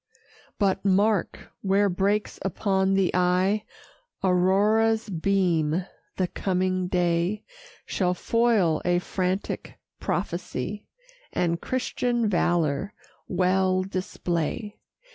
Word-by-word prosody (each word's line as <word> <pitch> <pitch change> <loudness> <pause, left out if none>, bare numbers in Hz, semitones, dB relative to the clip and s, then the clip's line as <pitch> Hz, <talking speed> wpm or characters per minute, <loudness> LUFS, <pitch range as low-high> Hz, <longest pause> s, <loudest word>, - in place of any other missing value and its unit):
But 195 -2 +1
mark! 200 0 +1
where 200 +1 +3
breaks 200 +3 0
upon 195 0 +1
the 195 -2 +2
eye 185 +4 +2 0.6
Aurora's 205 +4 +3
beam. 175 -2 +1 0.3
The 185 - +2
coming 185 0 -1
day 175 +3 0 0.4
Shall 180 -2 0
foil 220 -7 +2
a 175 0 +2
frantic 185 +2 -3 0.2
prophecy, 180 +1 -3 0.5
And 170 -1 0
Christian 245 -2 -1
valor 175 -1 0 0.3
well 185 +1 +2
display. 185 +1 -3
190 Hz, 85 wpm, -26 LUFS, 180-205 Hz, 0.6 s, where